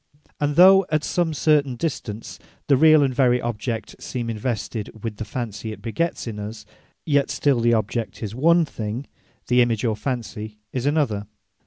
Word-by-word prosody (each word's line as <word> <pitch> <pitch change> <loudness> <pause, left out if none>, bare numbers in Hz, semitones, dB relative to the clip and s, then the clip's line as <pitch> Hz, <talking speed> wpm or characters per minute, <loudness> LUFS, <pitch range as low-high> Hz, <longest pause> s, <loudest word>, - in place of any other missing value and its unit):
And 145 0 0
though 190 +2 +7
at 155 -1 +1
some 175 -2 0
certain 150 -3 +2
distance, 115 -6 -5 0.3
the 140 - +4
reall, 155 +1 +6
and 130 - -1
very 125 -1 +3
object 115 -1 -4
seem 120 -2 -4
invested 110 -1 -3
with 110 -3 -4
the 110 - -4
fancy 110 -1 -5
it 110 - -8
begets 165 +9 -2
in 110 -3 -5
us; 105 +1 -7 0.4
Yet 145 -3 +2
still 140 -4 +1
the 120 0 +3
object 110 +2 -3
is 105 -1 -4
one 165 +7 +4
thing, 115 0 -5 0.4
the 125 0 +4
image 120 -1 +1
or 110 -2 +1
fancy 110 -4 -5 0.2
is 130 +1 -1
another. 125 -10 0
120 Hz, 170 wpm, -23 LUFS, 110-145 Hz, 0.4 s, though